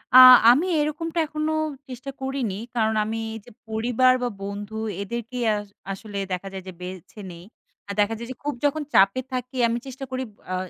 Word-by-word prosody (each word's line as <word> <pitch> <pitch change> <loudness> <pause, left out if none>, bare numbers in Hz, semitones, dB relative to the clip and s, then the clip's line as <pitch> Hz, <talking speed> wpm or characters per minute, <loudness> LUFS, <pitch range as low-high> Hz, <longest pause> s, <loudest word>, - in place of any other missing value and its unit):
আ - - +12 0.3
আমি 285 +8 +3
এরকমটা 325 +3 -1
এখনো 305 +1 -2 0.4
চেষ্টা 255 +2 -7
করিনি। 265 -7 -2 0.2
কারণ 220 -2 +2
আমি 220 +1 -3 0.3
যে - - -13 0.2
পরিবার, 240 +3 +3
বা 245 - +1
বন্ধু, 205 +2 -6 0.3
এদেরকে 235 +4 -5 0.2
আস 205 - -4 0.3
আসলে 200 +1 -7
দেখা 185 +2 -3
যায় 190 -1 -6
যে, - - -5
বেছে 185 +3 -9
নেই। 170 0 -11 0.4
আর 200 - -4
দেখা 205 +2 +3
যায় 235 - -6
যে, - - -6
খুব 295 0 -1
যখন 290 +2 +1
চাপে 195 +6 +5
থাকি 255 +1 -4
আমি 230 0 0
চেষ্টা 265 +1 -7
করি 260 0 -2
ব - - -28 0.2
আ - - +1
235 Hz, 185 wpm, -24 LUFS, 205-265 Hz, 0.4 s, আ